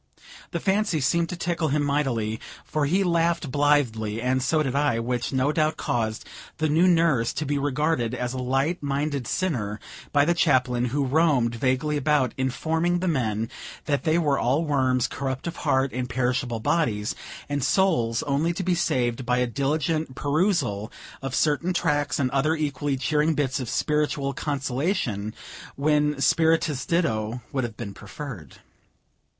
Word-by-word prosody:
The - - -3
fancy 195 -4 +1
seemed 170 +5 +1
to 180 - -3
tickle 170 -1 -1
him 145 +1 +1
mightily, 125 -7 0 0.3
for 150 -2 0
he 190 +6 +2
laughed 170 -4 +1
blithely, 125 -7 +1
and 130 +2 +1
so 155 +4 +2
did 130 -3 -2
I; 140 -4 +2
which, 120 +1 -2
no 135 +2 +1
doubt, 155 0 +1
caused 110 -2 -2 0.3
the 155 - +1
new 160 +5 +4
nurse 165 -9 +3
to 155 - -3
be 145 0 0
regarded 145 -3 0
as 125 0 -3
a 130 - -4
light 135 +7 0
minded 140 -2 -2
sinner 110 - -1 0.3
by 145 -1 +4
the 170 - +3
Chaplain, 125 -7 +2
who 140 +3 0
roamed 135 -4 +2
vaguely 130 +5 0
about, 145 -3 +2
informing 160 +7 0
the 185 +1 -2
men 115 -8 0 0.4
that 145 -2 0
they 160 0 +2
were 145 -5 +2
all 140 +7 +1
worms, 130 -4 +2
corrupt 130 -1 -4
of 170 0 -4
heart, 135 0 +1
with 125 0 -3
perishable 125 -2 -1
bodies, 110 -5 0 0.3
and 145 -2 -2
souls 125 -13 +2
only 145 +4 0
to 185 - -3
be 185 0 +1
saved 130 -7 0
by 125 +1 +1
a 125 - +2
diligent 140 +3 -1
perusal 145 - 0 0.3
of 135 -1 -3
certain 160 +4 +1
tracts, 145 -4 +1
and 130 -4 0
other 140 +4 +2
equally 145 -2 -1
cheering 150 +3 +1
bits 140 -1 0
of 125 -3 -4
spiritual 145 -1 0
consolation, 135 - -2 0.4
when 150 0 +1
spirituous 160 -2 +2
ditto 115 -8 0
would 130 -2 -1
have 115 -2 -5
been 100 -4 -6
preferred. 115 - -9
140 Hz, 160 wpm, -25 LUFS, 125-155 Hz, 0.4 s, new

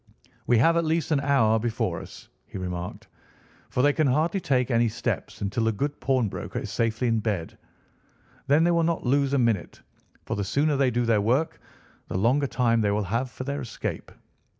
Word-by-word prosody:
"We 120 - +4
have 165 +9 +4
at 170 - +2
least 160 0 0
an 150 - +3
hour 120 -6 +3
before 115 0 -2
us," - - -12 0.2
he - - -8
remarked, 90 -1 -5 0.6
"for 125 - 0
they 145 0 +4
can 155 -1 +2
hardly 155 +9 +1
take 130 -6 0
any 115 0 +3
steps 115 +2 -4
until 105 +3 -1
the 115 - +3
good 140 +7 -3
pawnbroker 130 -6 -1
is - - -4
safely 115 +2 0
in 115 -1 +2
bed. 105 -7 -3 0.9
Then 145 +3 +4
they 175 - +3
will 170 -1 +3
not 165 -3 0
lose 140 +2 +2
a - - +3
minute, 115 -7 0 0.4
for - - -3
the 100 - -2
sooner 145 +9 +1
they 135 -1 +3
do 120 0 0
their 110 -3 +3
work 130 +10 0 0.5
the - - -3
longer 130 +8 +2
time 115 -3 +1
they 105 - +2
will 105 +1 0
have 115 +7 -2
for 125 - -7
their 140 +2 -3
escape. 115 -3 -5
125 Hz, 195 wpm, -26 LUFS, 110-140 Hz, 0.9 s, We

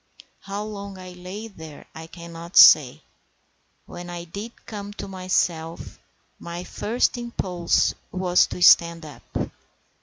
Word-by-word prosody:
How 200 +1 -5
long 200 -2 -7
I 185 0 -10
lay 180 +5 -8
there 160 -8 -12
I 160 0 -9
cannot 170 +2 -8
say. - - +8 0.8
When 175 0 -9
I 175 -1 -6
did 200 +7 -9
come 205 -1 -7
to 205 - -7
myself, 180 -3 -2 0.4
my 170 +1 -6
first 240 +6 -1
impulse 185 -8 0 0.2
was 180 -1 +3
to 180 - -3
stand 170 -2 +6
up. 150 - -11
180 Hz, 125 wpm, -24 LUFS, 170-200 Hz, 0.8 s, say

